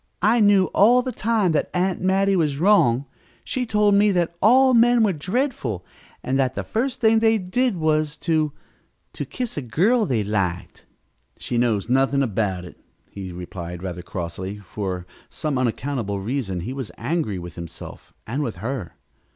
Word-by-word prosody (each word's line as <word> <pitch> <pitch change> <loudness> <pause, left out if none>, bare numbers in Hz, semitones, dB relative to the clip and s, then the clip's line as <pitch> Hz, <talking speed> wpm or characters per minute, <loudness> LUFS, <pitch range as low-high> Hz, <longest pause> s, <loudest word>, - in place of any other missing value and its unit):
"I 225 +4 +4
knew 205 -3 +5
all 245 +5 +5
the 255 - -3
time 220 -6 +1
that 155 - 0
Aunt 180 +1 0
Mattie 195 +1 +2
was 150 -6 +1
wrong. 145 - +4 0.4
She 250 -2 -2
told 210 -1 +3
me 205 +1 +5
that 170 -1 0
all 255 +5 +6
men 240 0 +5
were 205 -3 +2
dreadful, 170 - -2 0.4
and 135 +1 0
that 130 -1 +1
the - - -3
first 255 +3 -2
thing 225 -2 +4
they 225 0 +3
did 210 +3 0
was 155 -2 +1
to 155 -3 +1 0.6
to - - -4
kiss 245 -8 -5
a - - -1
girl 190 - +2
they 115 -5 0
liked." 95 -4 -3 0.5
"She 120 - -2
knows 110 -5 +1
nothing 135 +2 +2
about 95 -6 -1
it," 90 - -13 0.3
he 95 -2 -7
replied 90 0 -7
rather 90 -2 -5
crossly. 90 +3 -5
For 95 -2 -5 0.2
some 150 -5 -2
unaccountable 120 -4 -2
reason 100 -4 -3
he 120 +9 -5
was 135 -5 -5
angry 120 - -2
with 85 -2 -8
himself 85 -1 -9
and 130 +7 -3
with 120 -7 -3
her. 115 -5 -5
140 Hz, 165 wpm, -23 LUFS, -, 0.6 s, all